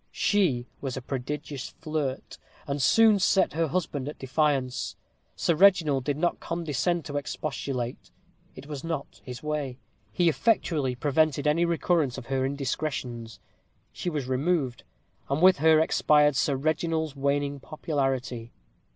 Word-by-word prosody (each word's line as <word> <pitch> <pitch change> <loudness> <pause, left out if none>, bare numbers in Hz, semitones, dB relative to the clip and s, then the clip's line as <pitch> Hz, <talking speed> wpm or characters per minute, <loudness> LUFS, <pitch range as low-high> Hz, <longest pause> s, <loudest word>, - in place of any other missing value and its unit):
She 165 - +1 0.2
was 135 -2 -4
a - - -4
prodigious 135 +1 -4
flirt, 155 -5 -4 0.3
and 140 0 -2
soon 215 +10 +5
set 190 0 +3
her 165 +1 +1
husband 145 -4 -2
at 150 - -8
defiance. 135 -2 0 0.4
Sir 170 - +1
Reginald 160 -7 +4
did 145 -1 -1
not 175 +2 0
condescend 165 0 -1
to 145 - -3
expostulate. 135 -4 -4 0.5
It - - -10
was 145 -2 -7
not 165 -4 -5
his 125 +1 -8
way. 150 -4 -3 0.3
He 175 - +2
effectually 155 - +1
prevented 145 +2 +1
any 160 +3 +3
recurrence 170 -5 +1
of - - -7
her 130 -1 +1
indiscretions. 130 -4 -4 0.5
She 180 - -3
was 150 -5 -3
removed, 130 0 0 0.5
and 140 +2 0
with 185 +2 +6
her 160 +2 +5
expired 150 -2 +4
Sir 140 +1 +1
Reginald's 155 +1 -1
waning 140 0 0
popularity. 135 -6 -3
145 Hz, 135 wpm, -27 LUFS, 135-160 Hz, 0.5 s, with